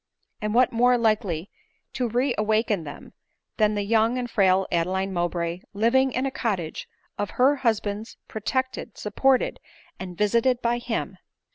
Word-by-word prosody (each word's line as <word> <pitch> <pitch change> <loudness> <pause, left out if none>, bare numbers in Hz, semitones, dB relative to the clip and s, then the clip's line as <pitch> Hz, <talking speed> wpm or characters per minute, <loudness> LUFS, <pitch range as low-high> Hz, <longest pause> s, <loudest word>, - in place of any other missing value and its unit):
And 210 +1 -2
what 255 +1 +5
more 245 +1 +4
likely 210 -6 0 0.4
to 250 -2 -1
re 250 +3 +1
awaken 215 -4 +1
them 145 0 -10 0.4
than 215 -1 +3
the 205 - -1
young 225 +3 +2
and 250 -1 -2
frail 190 -4 +3
Adeline 190 +3 0
Mowbray 175 -1 -1
living 245 +6 +3
in 255 +2 -1
a 270 - -1
cottage 195 -11 -3 0.3
of 205 - -1
her 275 +3 +4
husband's, 220 -3 -1
protected, 260 +4 -3
supported, 270 -1 +1 0.4
and 180 -2 -7
visited 235 +4 +2
by 240 0 0
him 240 -2 -4
220 Hz, 145 wpm, -25 LUFS, 195-245 Hz, 0.4 s, what